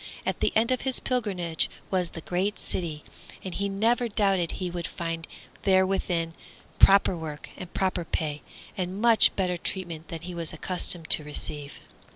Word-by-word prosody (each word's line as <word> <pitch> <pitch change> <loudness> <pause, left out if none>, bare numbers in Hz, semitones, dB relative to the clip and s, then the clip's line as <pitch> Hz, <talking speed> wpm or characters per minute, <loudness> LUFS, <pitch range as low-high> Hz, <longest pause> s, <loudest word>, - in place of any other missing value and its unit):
At - - -2
the - - +1
end 230 +3 +3
of 255 - +1
his 265 -1 +1
pilgrimage 190 -10 -1 0.2
was 180 -3 +1
the 165 - -8
great 185 +5 -1
city, 160 -4 -4 0.4
and 185 - -5
he 200 0 -1
never 230 +5 +1
doubted 195 -5 +1
he 180 -2 -4
would 175 -1 -4
find 165 -1 -5 0.3
therein 185 -3 +1 0.5
proper 195 -1 +6
work 155 -3 -7
and 180 - -9
proper 185 -2 -1
pay, 150 -2 -3 0.3
and 185 0 -3
much 230 0 +6
better 180 -2 0
treatment 170 -3 -5
than 165 -1 -6
he 180 +1 -7
was 170 -2 -3
accustomed 175 0 -2
to 155 - +11
receive. 145 -1 -6
180 Hz, 165 wpm, -27 LUFS, 165-195 Hz, 0.5 s, to